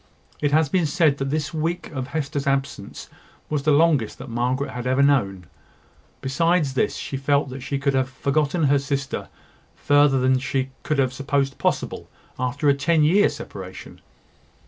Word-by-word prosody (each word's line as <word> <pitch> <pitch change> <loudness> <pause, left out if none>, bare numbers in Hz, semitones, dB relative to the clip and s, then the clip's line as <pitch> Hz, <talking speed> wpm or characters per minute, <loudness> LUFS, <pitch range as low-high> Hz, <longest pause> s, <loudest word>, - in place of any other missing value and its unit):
It 145 -1 0
has 155 +1 +4
been 170 +2 +1
said 150 -3 +2
that 135 0 -2
this 150 +1 -2
week 165 +3 -2
of 130 -3 -4
Hester's 145 -1 -3
absence 135 0 -2 0.4
was 150 -2 0
the 150 +2 +2
longest 145 -6 +3
that 135 -2 -9
Margaret 125 +4 -1
had 125 0 -5
ever 130 +2 +3
known. 100 -10 +1 0.8
Besides 165 +1 +1
this, 130 - 0
she 135 - -5
felt 140 +1 +1
that 130 +1 -7
she 140 +2 -3
had 135 -2 +1
forgotten 145 +5 0
her 140 -1 +4
sister 140 0 -3 0.5
further 145 -2 +3
than 130 0 +3
she 130 0 -2
could 150 - -1
have 130 -2 +1
supposed 135 0 -1
possible - - -2 0.3
after 125 +3 -1
a 140 - +6
ten 155 +3 +2
years' 190 +7 +4
separation. - - -9
140 Hz, 165 wpm, -23 LUFS, 130-150 Hz, 0.8 s, a